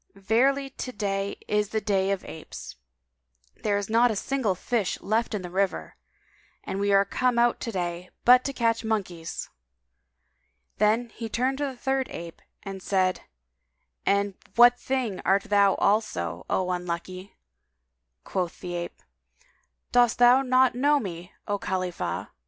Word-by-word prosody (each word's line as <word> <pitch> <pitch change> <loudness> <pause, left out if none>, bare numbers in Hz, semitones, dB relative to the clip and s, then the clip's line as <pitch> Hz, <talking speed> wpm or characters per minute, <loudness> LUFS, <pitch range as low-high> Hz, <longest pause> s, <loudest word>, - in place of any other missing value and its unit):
Verily, 260 +8 +1
to 255 - -6
day 200 -3 -2
is 210 -1 0
a - - +3
day 195 -2 +1
of 195 -1 -2
apes: 65 - -9 0.8
there 205 -1 0
is 205 -1 -3
not 230 +2 +4
a 220 - -1
single 230 -3 -1
fish 215 0 -1
left 220 +2 0
in 195 - -4
the 180 - -6
river, 195 +1 -1 0.7
and 195 - -4
we 200 0 +1
are 195 0 +5
come 250 +4 0
out 235 0 +3
to 230 - -4
day 175 -2 -3 0.2
but 250 +1 +7
to 275 - -1
catch 230 -3 0
monkeys!" 185 -7 -3 1.3
Then 220 +3 +2
he 225 0 -7
turned 260 +4 0
to 290 - 0
the 265 -2 -5
third 265 +1 0
ape 170 -1 -8 0.2
and 195 -1 -7
said, 185 -1 +1 0.8
"And 200 0 +1 0.2
what 245 +1 +7
thing 255 -7 -2
art 195 +1 +3
thou 200 -1 +3
also, 85 - 0
O 185 -1 0
unlucky?" 180 +2 -5 0.9
Quoth 180 -3 -3
the 180 -1 -6
ape, 175 0 -6 0.9
"Dost 245 -1 +4
thou 245 +2 +6
not 255 -1 +3
know 285 +4 +3
me, 180 -6 -7 0.2
O 205 0 -1
Khalifah!" 185 -2 -3
205 Hz, 150 wpm, -26 LUFS, 185-245 Hz, 1.3 s, but